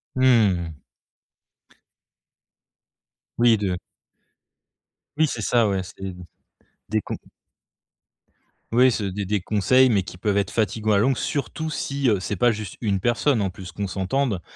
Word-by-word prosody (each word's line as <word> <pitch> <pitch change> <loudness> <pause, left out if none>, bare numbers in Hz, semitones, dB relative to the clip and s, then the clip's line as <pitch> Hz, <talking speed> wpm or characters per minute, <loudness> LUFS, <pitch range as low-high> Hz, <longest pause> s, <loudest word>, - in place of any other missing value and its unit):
Mmh. 105 -10 +3 2.6
Oui 120 -1 +5
de 95 -3 -1 1.4
Oui, 160 0 +4
c'est 120 - -4
ça, 115 +2 +3
ouais, 95 -1 0
c'est 95 - -13
d 95 -2 -5 0.7
des 110 0 +1
con - - -5 1.6
Oui, 125 +3 +5
c'est 100 -4 -2
des 100 +1 -3
des 105 +2 0
conseils 110 +7 +3
mais 105 -5 +3
qui 90 - -10
peuvent 100 +2 0
être 100 0 +1
fatiguant 110 0 0
à - - +4
longue, 125 +5 +2
surtout 155 +2 -3
si, 140 -3 -1
heu, 105 -4 +2
c'est 100 +3 -3
pas 120 +6 +3
juste 105 -3 -6
1 100 -4 0
personne 120 +4 +1
en 95 -2 -1
plus. 90 0 -10
Qu'on 100 +3 -4
s'entende, 100 +2 -1
105 Hz, 145 wpm, -23 LUFS, 95-120 Hz, 2.6 s, Oui